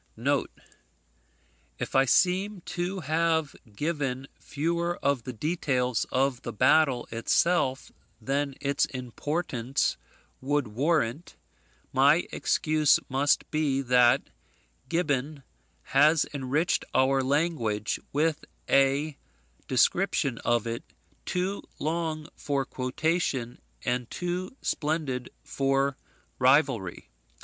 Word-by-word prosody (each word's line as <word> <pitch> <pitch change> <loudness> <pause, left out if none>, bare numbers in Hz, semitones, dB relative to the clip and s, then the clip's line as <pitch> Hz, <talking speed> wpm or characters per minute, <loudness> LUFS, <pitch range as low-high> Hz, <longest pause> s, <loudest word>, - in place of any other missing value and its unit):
[If - - -5
I 135 0 +5
seem 185 +6 +2
to 180 +3 -3
have 160 0 0 0.2
given 135 -3 -2
fewer 170 +3 -2
of 140 -4 0
the 125 - -4
details 125 -3 -1
of 130 -1 +1
the 120 - -5
battle 130 +2 +3
itself 130 +4 +1 0.3
than 140 0 -1
its 140 0 +1
importance 130 0 -2 0.4
would 140 -2 0
warrant, 145 +3 0 0.6
my 145 +6 +4
excuse 155 -2 +2
must 140 +2 +1
be, 145 -3 +1
that 125 -1 +4 0.6
Gibbon 145 -4 -1 0.4
has 150 - +4
enriched 145 +4 0
our 135 +1 +3
language 130 -8 0
with 155 +2 0 0.2
a 140 +2 +2 0.5
description 135 -1 +2
of 120 -2 +1
it, 115 0 -4 0.4
too 185 +2 -1 0.2
long 155 -1 -2
for 140 -2 -1
quotation 130 -2 -2 0.2
and 125 -1 -1
too 180 +6 -4
splendid 145 -5 -2
for 135 0 0 0.4
rivalry. 130 - +2
140 Hz, 95 wpm, -27 LUFS, 130-160 Hz, 0.6 s, I